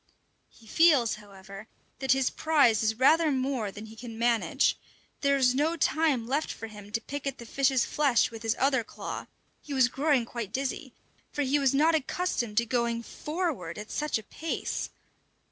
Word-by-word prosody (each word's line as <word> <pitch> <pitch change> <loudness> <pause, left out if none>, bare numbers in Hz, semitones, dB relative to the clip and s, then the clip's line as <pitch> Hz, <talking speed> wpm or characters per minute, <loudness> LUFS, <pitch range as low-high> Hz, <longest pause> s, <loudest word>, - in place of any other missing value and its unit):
He 230 - -21
feels, 270 -3 +4
however, 195 +1 -12 0.3
that 265 -1 +3
his 265 -1 +1
prize 280 -9 +3
is 220 0 +1
rather 310 +5 +4
more 260 -5 -1
than 205 +3 -9
he 220 0 -12
can 230 0 -9
manage. 235 -1 +2 0.4
There 280 -1 +2
is 255 -2 +3
no 310 +5 +1
time 305 -6 +1
left 280 +6 -1
for - - -7
him 210 -2 -11
to 230 - +1
pick 285 +2 -5
at 275 - -3
the 235 - -10
fish's 265 0 +2
flesh 275 -8 +2
with 225 -1 -9
his 225 -1 0
other 265 -3 +2
claw; - - -7 0.3
he 285 - -6
was 255 -2 +4
growing 275 -2 +1
quite 230 -4 -6
dizzy, 265 +1 -3 0.4
for 290 - -1
he 280 +2 +2
was 275 -1 +2
not 315 +4 +4
accustomed 275 -7 -1
to 235 - +4
going 235 -1 -1
forward 300 - -4
at 210 +1 -8
such 300 -4 -1
a 220 - -8
pace! 320 +9 -4
255 Hz, 180 wpm, -28 LUFS, 225-285 Hz, 0.4 s, feels